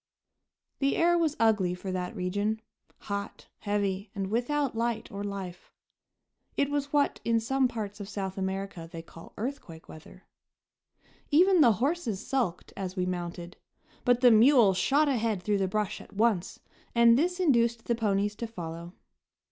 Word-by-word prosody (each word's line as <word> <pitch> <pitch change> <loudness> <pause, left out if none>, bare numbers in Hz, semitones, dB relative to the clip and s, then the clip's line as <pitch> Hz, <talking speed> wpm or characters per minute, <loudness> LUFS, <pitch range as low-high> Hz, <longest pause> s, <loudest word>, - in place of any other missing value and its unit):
The 275 0 +1
air 345 +1 +3
was 325 -3 +1
ugly, 210 -6 +2
for 185 +1 -6
that 185 +3 -3
region 205 +3 -1 0.4
hot, 200 -1 -6
heavy, 200 -1 -1
and 195 0 -3
without 255 +3 0
light 230 -1 -2
or 200 0 -5
life. 195 -3 -6 0.9
It 280 0 +1
was 285 -1 -2
what 290 -1 +1
in 230 0 +2
some 265 +3 +1
parts 215 -3 -6
of 200 -1 -7
South 190 -3 -4
America 190 -3 -4
they 165 -1 -7
call 165 0 -14
"earthquake 210 - -6
weather." 160 +4 -13 1.0
Even 360 +3 +5
the 235 -6 +6
horses 250 - -2
sulked 235 -10 -2
as 185 -1 -5
we 180 -2 0
mounted; 175 -1 -5 0.5
but 245 0 +3
the 250 -2 +7
mule 230 -2 +6
shot 285 +11 +2
ahead 225 -8 0
through 205 0 +1
the 190 - +1
brush 210 +1 -2
at - - -15
once, 210 -3 0 0.4
and 235 0 +6
this 355 +7 +1
induced 235 -8 +2
the 235 - +1
ponies 205 -2 0
to 235 - -4
follow. 170 -4 -7
215 Hz, 155 wpm, -28 LUFS, 190-245 Hz, 1.0 s, the